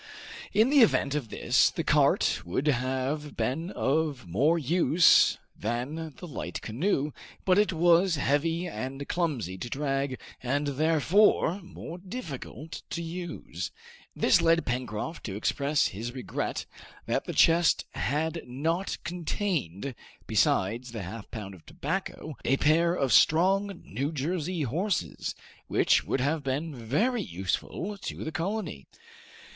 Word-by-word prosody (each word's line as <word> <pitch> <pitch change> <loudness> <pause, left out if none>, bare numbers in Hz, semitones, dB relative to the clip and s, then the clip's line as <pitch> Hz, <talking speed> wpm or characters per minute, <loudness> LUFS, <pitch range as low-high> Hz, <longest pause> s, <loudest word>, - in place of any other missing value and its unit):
In 220 +6 +4
the 290 - +6
event 200 - +4
of 145 -7 -2
this, - - +3
the - - -3
cart - - +3
would 90 +11 -2
have 135 +2 -1
been 160 +7 -1
of 145 - -1
more 140 - +3
use 165 +2 +5 0.2
than 135 +8 -3
the - - -8
light 100 - -5
canoe, 145 - 0 0.3
but 185 +1 +4
it 210 - +3
was 175 +1 +4
heavy 165 +5 +1
and 135 -3 -5
clumsy 125 - -2
to 120 - -5
drag, 135 -1 -1 0.2
and 140 +4 0
therefore 160 +6 +3
more 175 -1 -9
difficult 165 - -7
to 170 - -3
use; 175 0 -5 0.5
this 180 - +4
led 165 0 +3
Pencroft 125 +5 -3
to 95 - -4
express 140 +7 +1
his 115 +5 -5
regret 130 - -3 0.4
that - - -1
the - - -4
chest 170 0 +4
had 160 +4 -1
not 165 +9 -1
contained, 160 - -2 0.3
besides 115 +7 +1
"his 115 -2 -5
halfpound 105 +1 -7
of 90 - -14
tobacco," 170 -2 -4
a 135 - +2
pair 165 +4 +3
of 135 -8 +1
strong 190 - +4
New 140 +4 -2
Jersey 165 +3 -2
horses, 145 - -2 0.3
which - - +3
would 135 - -1
have 150 +4 +1
been 140 +4 -2
very 145 - 0
useful 95 - -3
to - - -5
the 160 - -4
colony! 175 - -3
150 Hz, 130 wpm, -28 LUFS, 130-170 Hz, 0.5 s, the